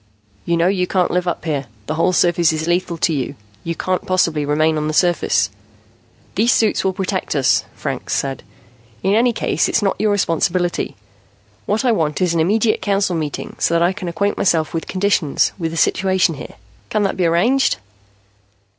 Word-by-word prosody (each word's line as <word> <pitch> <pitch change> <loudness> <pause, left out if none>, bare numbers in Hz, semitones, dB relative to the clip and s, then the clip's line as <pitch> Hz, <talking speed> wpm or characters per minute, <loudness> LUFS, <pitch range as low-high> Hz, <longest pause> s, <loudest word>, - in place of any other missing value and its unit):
"You 170 0 +1
know 165 - +2
you 180 -1 +1
can't 180 -2 +1
live 180 0 0
up 175 - -3
here. 145 -5 -2 0.2
The 155 - -3
whole 165 +3 +2
surface 175 -2 +3
is 160 0 -2
lethal 175 0 0
to 165 - +1
you. 140 0 -3 0.3
You 170 0 -3
can't 185 +2 -1
possibly 165 -5 +1
remain 155 +2 +2
on 150 0 -1
the 155 - -2
surface." 165 - +2 0.8
"These 230 +6 +3
suits 220 -2 +2
will 190 - +2
protect 190 -3 -3
us," 135 -2 +2
Franks - - -3
said. 135 -1 -2 0.6
"In 195 - +2
any 235 +3 +4
case, 225 - 0
it's 225 - +1
not 195 0 0
your 215 - +2
responsibility. 175 -2 0 0.7
What 215 +5 0
I 245 - +4
want 155 -8 0
is 180 -2 +1
an 165 - +1
immediate 215 +7 +2
Council 200 -3 0
meeting 155 -3 -4
so 170 0 +2
I 175 +2 +2
can 190 -2 -6
acquaint 200 +4 -1
myself 165 -4 +1
with 165 - -3
conditions, 185 -6 +1
with 165 -2 -1
the 165 - -6
situation 185 +1 +2
here. 145 - -9 0.3
Can 215 -1 0
that 195 - 0
be 180 -2 +1
arranged?" 230 - +2
175 Hz, 185 wpm, -19 LUFS, 160-195 Hz, 0.8 s, any